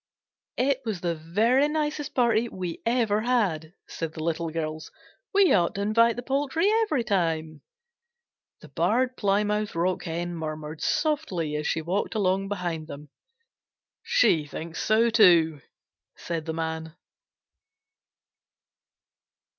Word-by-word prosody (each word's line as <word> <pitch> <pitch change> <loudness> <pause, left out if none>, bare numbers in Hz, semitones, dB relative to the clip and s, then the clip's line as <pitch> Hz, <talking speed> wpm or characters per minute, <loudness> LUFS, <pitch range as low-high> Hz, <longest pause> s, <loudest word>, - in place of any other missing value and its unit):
"It 270 +1 +1
was 215 -7 -4
the 175 -1 0
very 215 - +2
nicest 300 -1 -2
party 235 -2 +2
we 180 -3 -5
ever 225 -3 +2
had," 195 -9 0
said 165 -1 -5
the 155 - -5
Little 165 0 -1
Girls. 155 -1 -4 0.4
"We 395 -3 +5
ought 175 -3 +2
to 200 - -2
invite 230 +3 +3
the 245 - -6
poultry 285 +7 0
every 305 - 0
time." 160 -7 -1 1.0
The - - -13
Barred 255 +1 +1
Plymouth 210 0 0
Rock 180 +3 0
Hen 170 +1 -3
murmured 155 -1 -6
softly 290 - -1
as 150 0 -2
she 160 - -1
walked 190 +7 -2
along 195 -1 +1
behind 175 -5 -3
them. 145 -1 -10 0.9
"She 455 - +2
thinks 165 +2 -6
so 225 +2 +3
too," 170 - +5 0.5
said 165 -2 -5
the 160 - -2
Man. 160 0 -4
185 Hz, 125 wpm, -26 LUFS, 160-235 Hz, 1.0 s, We